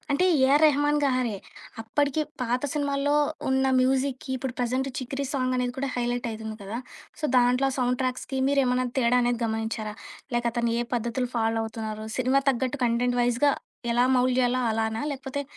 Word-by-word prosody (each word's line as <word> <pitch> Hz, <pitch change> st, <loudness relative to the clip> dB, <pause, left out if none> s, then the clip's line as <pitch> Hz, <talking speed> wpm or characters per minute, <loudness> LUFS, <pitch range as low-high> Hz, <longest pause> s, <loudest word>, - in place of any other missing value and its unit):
అంటే 285 Hz, +6 st, +2 dB, 0.2 s
ఏఆర్‌రెహమాన్ 295 Hz, +1 st, +4 dB
గారే. 255 Hz, -6 st, +1 dB, 0.5 s
అప్పటికి 285 Hz, +6 st, 0 dB, 0.2 s
పాత 245 Hz, +2 st, 0 dB
సినిమాల్లో 285 Hz, 0 st, 0 dB, 0.3 s
ఉన్న 265 Hz, 0 st, +2 dB, 0.2 s
మ్యూజిక్‌కి. 260 Hz, 0 st, 0 dB
ఇప్పుడు 260 Hz, 0 st, -4 dB
ప్రెజెంట్ 255 Hz, +2 st, 0 dB
'చికరి' 270 Hz, +2 st, -3 dB
సాంగ్ 255 Hz, -2 st, 0 dB
అనేది 250 Hz, 0 st, -1 dB
కూడా 275 Hz, -, -1 dB
హైలైట్ 245 Hz, 0 st, -1 dB
అయితుంది 220 Hz, 0 st, -6 dB
కదా! 210 Hz, +4 st, -5 dB, 0.4 s
సో -, -, -4 dB
దాంట్లో 250 Hz, +2 st, +4 dB
సౌండ్ 250 Hz, 0 st, +1 dB
ట్రాక్స్‌కి 255 Hz, +1 st, -2 dB
మీరేమన్నా 255 Hz, -2 st, +2 dB
తేడా 250 Hz, 0 st, +3 dB
అనేది 240 Hz, -1 st, +1 dB
గమనించారా? 220 Hz, -1 st, -3 dB, 0.4 s
లేక 240 Hz, 0 st, 0 dB
అతను 235 Hz, -1 st, 0 dB
ఏ -, -, +1 dB
పద్ధతులు 235 Hz, +2 st, -1 dB
ఫాలో 225 Hz, 0 st, +1 dB
అవుతున్నన్నారు? 220 Hz, -1 st, -5 dB
సినిమా 260 Hz, +2 st, +2 dB
తగ్గట్టు 260 Hz, +2 st, -2 dB
కంటెంట్ 245 Hz, +1 st, +1 dB
వైస్‌గా. 245 Hz, +4 st, +3 dB, 0.4 s
ఎలా 245 Hz, +1 st, +3 dB
మౌల్డ్ 250 Hz, 0 st, +2 dB
చేయాలో 250 Hz, +1 st, +1 dB
అలానా? 220 Hz, +1 st, -1 dB
లేకపోతే 275 Hz, +1 st, -4 dB
250 Hz, 155 wpm, -26 LUFS, 235-270 Hz, 0.5 s, ఏఆర్‌రెహమాన్